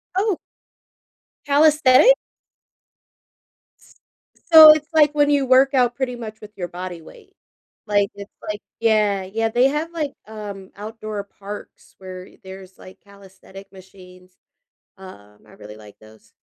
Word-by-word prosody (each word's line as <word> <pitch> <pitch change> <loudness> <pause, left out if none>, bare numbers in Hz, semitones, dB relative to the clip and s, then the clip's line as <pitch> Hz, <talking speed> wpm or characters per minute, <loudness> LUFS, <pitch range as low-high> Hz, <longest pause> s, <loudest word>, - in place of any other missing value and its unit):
Oh 395 -1 0 1.1
calisthenics? 295 - +5 1.7
S - - -23 0.6
so 315 -1 +11
it's 305 0 0
like 300 -2 +4
when 290 0 +2
you 285 -2 +1
work 265 +2 +3
out 245 -2 +1
pretty 255 -2 -3
much 220 -2 -10
with 210 0 -12
your 175 -2 -5
body 180 -1 -8
weight, 395 - -18 0.5
like, 205 -1 +1
it's 200 0 -11 0.2
like 210 -1 -5 0.2
yeah, 210 -4 +1
yeah, 225 +4 -3
they 245 +3 +2
have, 305 +4 -3
like, 300 -4 -4
um, 205 -3 -10
outdoor 215 0 -7
parks 200 +1 -12
where 185 -1 -10
there's, 190 0 -13
like, 185 +1 -15
calisthenic 195 -1 -16
machines, 185 -1 -18 0.6
um, 105 - -15
I - - -20
really 105 0 -13
like 105 -1 -16
those. 110 0 -20
210 Hz, 135 wpm, -20 LUFS, 190-270 Hz, 1.7 s, so